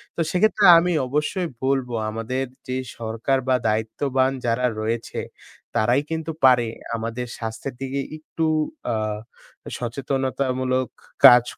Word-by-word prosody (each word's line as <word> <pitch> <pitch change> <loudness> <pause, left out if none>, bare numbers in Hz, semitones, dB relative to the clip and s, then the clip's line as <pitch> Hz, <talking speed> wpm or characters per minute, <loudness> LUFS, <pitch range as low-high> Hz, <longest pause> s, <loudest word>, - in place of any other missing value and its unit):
তো - - -8
সেক্ষেত্রে 210 +2 +3
আমি 175 +2 +2 0.2
অবশ্যই 150 +7 -1 0.2
বলব 135 -1 +1 0.2
আমাদের 115 +4 -2 0.2
যে 130 0 -2 0.2
সরকার 115 +4 -1
বা 130 - +4
দায়িত্ববান 130 +5 +1
যারা 120 +2 +1
রয়েছে 115 +2 -2 0.6
তারাই 120 +5 +3
কিন্তু 160 0 -2
পারে 125 -2 +5 0.3
আমাদের 115 +2 -3
স্বাস্থ্যের 115 +4 -5
দিকে 135 +1 -2 0.2
একটু 160 +1 -3 0.4
অ্যা 115 - 0 0.8
সচেতনতামূলক 130 0 -1 0.4
কাজ, 120 -1 +10
130 Hz, 115 wpm, -23 LUFS, 115-140 Hz, 0.8 s, কাজ